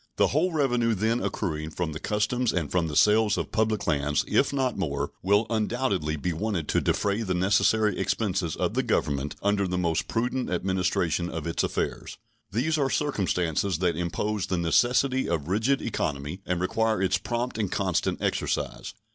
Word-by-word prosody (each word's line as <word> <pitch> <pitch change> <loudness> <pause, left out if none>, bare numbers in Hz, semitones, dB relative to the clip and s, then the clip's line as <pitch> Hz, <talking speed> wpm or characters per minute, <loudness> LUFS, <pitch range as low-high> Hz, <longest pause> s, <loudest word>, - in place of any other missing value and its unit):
The - - +3
whole 165 +6 +1
revenue 120 -7 +1
then 110 +4 0
accruing 80 -5 -2
from 80 0 -3
the 75 - -6
customs 110 +5 0
and 80 -5 -2
from 90 -2 +1
the 75 - -5
sales 105 +2 +4
of - - -3
public 110 -1 0
lands, 75 0 +1
if - - +2
not 130 -3 0
more, 70 -3 -2
will 100 +3 +3
undoubtedly 110 -8 0
be 85 +4 -2
wanted 90 -3 -2
to - - +2
defray 100 +2 0
the 95 -5 -1
necessary 105 +2 +3
expenses 95 -4 -1
of - - -1
the - - +2
Government 70 0 -1
under 100 -1 +2
the 90 0 -2
most 85 -3 0
prudent 125 +2 -1
administration 90 -2 0
of 80 -3 -5
its 85 - -1
affairs. - - -3 0.3
These 150 +9 0
are 135 -2 +2
circumstances 95 - 0
that 90 -1 +1
impose 90 +4 -2
the 90 - -1
necessity 125 +10 +2
of 80 -3 -1
rigid 110 +9 +1
economy 75 -4 -3
and 90 -1 0
require 110 +4 +1
its 95 -2 +1
prompt 120 +2 -3
and 100 -4 -1
constant 95 -4 0
exercise. - - -2
100 Hz, 170 wpm, -26 LUFS, 85-115 Hz, 0.3 s, sales